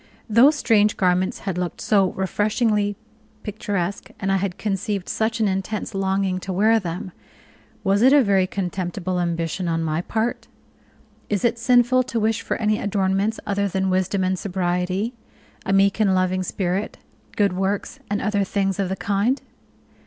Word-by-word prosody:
Those 245 +7 +5
strange 215 -6 +3
garments 185 0 +1
had 190 -3 -3
looked 180 -1 -3
so 195 -3 +3
refreshingly 205 +1 0 0.5
picturesque, 200 -3 -3
and 195 0 -1
I 195 - +3
had 190 -2 -2
conceived 200 -1 -2
such 225 +1 -1
an 220 - +2
intense 195 +3 -3
longing 190 -1 0
to 190 - -5
wear 215 +5 +3
them! 180 0 -5 0.7
Was 200 0 +2
it 260 +3 +6
a 285 -1 +6
very 195 -3 +2
contemptible 185 -1 -3
ambition 170 +1 -2
on 165 -1 0
my 160 +1 -1
part? 225 +5 -2 0.8
Is 210 +3 0
it 235 0 +1
sinful 245 +1 +4
to 235 -2 -2
wish 220 +1 +1
for - - -2
any 215 -1 +1
adornments 200 +1 0
other 200 0 0
than 190 0 -1
wisdom 185 +1 +1
and 185 0 0
sobriety, 185 +3 -1 0.5
a - - +1
meek 195 +2 +3
and 195 -3 +3
loving 185 0 +1
spirit, 185 +2 -2 0.4
good 200 -3 +2
works, 195 +2 -2
and 205 0 -1
other 205 -2 +1
things 195 0 -1
of 195 -2 0
the 190 - -1
kind? 205 +8 0
195 Hz, 160 wpm, -22 LUFS, 185-215 Hz, 0.8 s, it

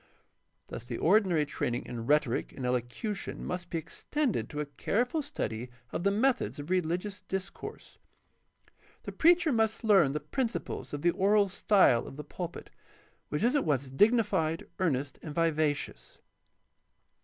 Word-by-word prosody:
Thus - - -7
the 120 -1 -5
ordinary 180 -4 +3
training 125 -4 -2
in 115 -1 -6
rhetoric 145 -5 +1
and 130 - -5
elocution 125 - -3
must 180 -1 -4
be 170 - -2
extended 265 - -2
to 150 - -5
a 150 - -1
careful 235 - -1
study 125 - -4 0.2
of - - -2
the 200 - +4
methods 250 +6 +1
of 145 +4 -6
religious 185 +3 -1
discourse. 190 0 -6 1.0
The - - -5
preacher 340 -1 +4
must 220 -2 +1
learn 190 -11 +5
the 150 - -1
principles 230 - -3
of 145 -1 -5
the 175 - +5
oral 200 +2 +3
style 185 - +4
of - - -9
the 150 - -5
pulpit, 175 +3 -7 0.6
which 150 - -1
is 245 +5 +3
at 290 - +3
once 140 -4 0
dignified, 190 - +2
earnest, 145 -6 -1
and 150 -2 -7
vivacious. 155 -3 -1
175 Hz, 145 wpm, -30 LUFS, 145-210 Hz, 1.0 s, learn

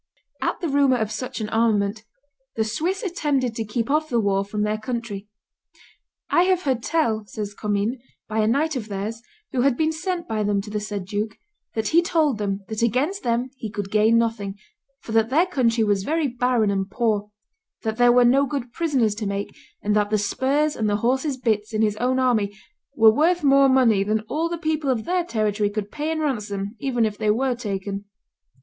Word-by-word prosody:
At - - -1
the 340 - -1
rumor 280 -3 +3
of 220 -2 -2
such 220 +2 -4
an 210 - -3
armament 215 -1 +1 0.5
the 220 - +1
Swiss 340 - -2
attempted 290 - 0
to 225 - -3
keep 220 +2 -2
off 310 +1 +1
the 240 - +2
war 200 -2 +1
from 210 +1 -3
their 210 0 -1
country. 230 -4 -5 1.0
"I 350 - +5
have 370 -1 +2
heard 260 -4 0
tell," 235 -8 0
says 205 0 -5
Commynes, 210 +4 -1 0.3
"by 220 0 -2
a 215 - +3
knight 300 +7 +1
of 230 -5 -4
theirs, 210 +3 -4 0.3
who 255 - 0
had 265 -1 +2
been 315 0 +2
sent 345 +2 -3
by 220 -1 -1
them 205 -1 +1
to 210 +1 -9
the 210 - -1
said 205 -2 -5
duke, 210 +2 -3 0.4
that 220 -1 0
he 335 +2 +5
told 310 -9 +1
him 200 -1 -1
that 220 +1 -4
against 265 - +1
them 240 0 -1
he 220 - -5
could 200 -1 -5
gain 220 +2 +4
nothing, 220 -4 -1 0.4
for - - -9
that 225 0 +3
their 315 +7 +4
country 245 -10 +1
was 205 -2 +2
very 315 +4 0
barren 245 -4 +1
and 195 0 -1
poor; 210 -2 0 0.5
that 220 0 -2
there 245 0 +6
were 245 0 +5
no 275 +3 +4
good 250 -3 -4
prisoners 270 -11 +1
to 210 0 -4
make, 200 0 -4 0.3
and 210 0 +1
that 210 -1 +2
the 215 - +2
spurs 275 +9 +1
and 215 -2 0
the 205 - +2
horses' 265 +2 +1
bits 220 -3 -1
in 215 - +2
his 210 -1 +1
own 255 +2 +1
army 235 -6 +2 0.4
were 220 -1 +7
worth 335 +6 +2
more 275 -1 +5
money 235 -7 +4
than 215 +2 0
all 310 +10 -2
the 340 - -3
people 315 -3 -1
of 235 -4 0
their 360 0 +1
territory 215 - 0
could 205 0 -4
pay 300 +1 -3
in 320 0 -1
ransom 210 -7 -2
even 245 -4 +1
if 210 -1 -3
they 215 -1 +1
were 250 +4 +2
taken." 200 -3 -4
230 Hz, 210 wpm, -23 LUFS, 210-275 Hz, 1.0 s, were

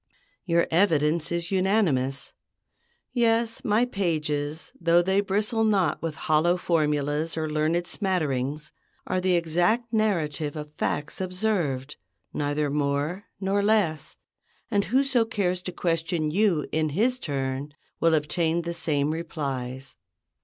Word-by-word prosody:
Your 170 -2 +3
evidence 165 -2 +2
is 170 +1 -2
unanimous; 185 -9 +1 0.8
yes, 230 -1 +1
my 225 0 +3
pages, 155 -8 -2
though 170 +1 +4
they 190 +2 +2
bristle 210 +3 0
not 195 -8 +2
with 165 -2 -3
hollow 160 +3 +3
formulas 150 -1 0
or 160 -1 -1
learned 155 +3 0
smatterings, 150 -7 -1 0.3
are 185 - -1
the 185 -1 +2
exact 175 +8 +1
narrative 165 -9 0
of 150 -1 -6
facts 145 +3 -2
observed, 180 -8 -1 0.4
neither 145 0 -1
more 145 +6 -1
nor 195 +1 +1
less; 200 -7 +1 0.5
and 200 -2 +2
whoso 260 -1 +2
cares 185 -5 -1
to 180 - -5
question 165 -2 -1
you 185 -4 +2
in 155 0 +1
his 235 - +1
turn 140 - -3 0.2
will 165 -1 +4
obtain 160 +2 0
the 170 0 -3
same 150 -3 0
replies. 135 -5 -5
170 Hz, 125 wpm, -26 LUFS, 150-195 Hz, 0.8 s, though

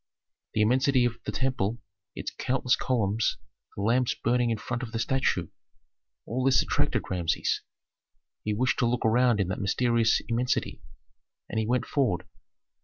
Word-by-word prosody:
The 105 - +3
immensity 130 +2 +3
of 120 -1 -2
the - - -2
temple, 125 -4 -1 0.4
its - - -4
countless 125 -1 +1
columns, 110 -3 0 0.4
the 100 - -4
lamps 120 +3 +2
burning 120 0 +1
in 115 - 0
front 120 +3 -4
of 115 -4 -6
the - - -1
statue, 115 - 0 0.8
all 125 +4 -2
this 130 -1 +4
attracted - - 0
Rameses. 85 -3 0 0.8
He 105 -1 -1
wished 125 +4 +1
to 120 - +3
look 120 0 0
around 120 0 +3
in 95 - +1
that 95 - -3
mysterious 115 +3 +2
immensity, 120 +2 -1 0.7
and 110 - -1
he 110 - -1
went 125 +2 +1
forward. 95 -11 0
120 Hz, 155 wpm, -27 LUFS, 110-125 Hz, 0.8 s, this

